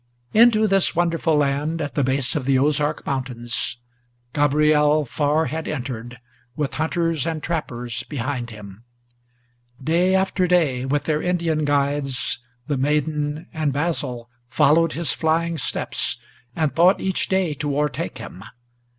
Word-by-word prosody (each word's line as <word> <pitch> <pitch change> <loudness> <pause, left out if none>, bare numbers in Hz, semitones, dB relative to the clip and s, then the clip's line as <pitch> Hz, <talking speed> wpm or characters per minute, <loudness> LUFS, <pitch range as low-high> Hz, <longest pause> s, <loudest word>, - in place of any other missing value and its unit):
Into 220 -1 +6
this 195 -4 +2
wonderful 165 -2 +1
land, 145 +3 0
at 145 -3 -3
the 145 - +1
base 130 +2 0
of 145 -4 -1
the 135 0 +3
Ozark 145 +2 +1
Mountains, 125 -3 -3 0.6
Gabriel 150 +1 +3
far 150 +4 +1
had 160 +1 -4
entered, 120 -4 -5 0.4
with 150 -3 -2
hunters 165 -1 0
and 160 -2 -3
trappers 125 -8 -3
behind 130 -3 -3
him. 105 -1 -11 1.0
Day 170 +6 +2
after 190 -1 +1
day, 150 -8 +2
with 145 +2 0
their 155 -1 0
Indian 170 -4 0
guides, 140 -3 0 0.3
the 145 -2 -1
maiden 150 +2 0
and 155 -3 0
Basil 135 -5 -2 0.2
Followed 155 +5 +3
his 170 -1 0
flying 165 0 0
steps, - - -2 0.4
and 155 -3 0
thought 175 +3 +5
each 190 -1 -1
day 190 -4 +1
to 145 0 -2
o'ertake 150 -1 -2
him. 90 - -9
150 Hz, 135 wpm, -22 LUFS, 135-165 Hz, 1.0 s, Into